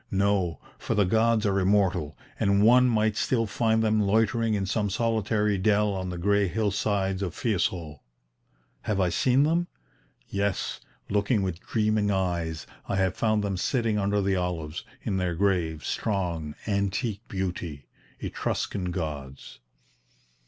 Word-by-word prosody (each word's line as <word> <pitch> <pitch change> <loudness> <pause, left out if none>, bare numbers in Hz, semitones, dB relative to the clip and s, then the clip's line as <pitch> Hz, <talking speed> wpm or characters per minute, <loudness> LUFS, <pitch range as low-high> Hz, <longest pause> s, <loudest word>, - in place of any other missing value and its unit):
No, 100 -3 +1 0.2
for 115 - -2
the 105 -1 +4
gods 110 +3 +2
are 100 -1 +2
immortal, 95 -6 +1 0.2
and 100 +1 +3
one 125 +3 +6
might 110 -2 +2
still 115 +1 +1
find 110 +1 +1
them 110 -1 +2
loitering 110 +2 +2
in 100 -1 -1
some 105 +2 0
solitary 105 -1 0
dell 105 +1 +2
on 95 -1 -3
the 90 - -4
grey 100 +3 +2
hillsides 100 -1 0
of 90 -3 -3
Fiesole. 85 - -1 0.8
Have 105 -2 -1
I 90 -2 +3
seen 125 +10 +3
them? 170 +3 +1 0.6
Yes, 100 -1 -2 0.3
looking 105 +1 +2
with 90 -3 -3
dreaming 105 0 0
eyes, 85 -5 -1 0.2
I - - 0
have 95 -2 +1
found 110 -2 +1
them 100 -2 -1
sitting 115 +2 0
under 100 0 +1
the 95 0 +1
olives, 85 -4 -3 0.2
in 95 - -1
their 90 -2 -1
grave, 85 -5 0
strong, 85 -7 -2
antique 100 +1 -1
beauty 90 -6 -4 0.3
Etruscan 90 -3 -2
gods!" 75 -6 -6
100 Hz, 140 wpm, -27 LUFS, 90-110 Hz, 0.8 s, one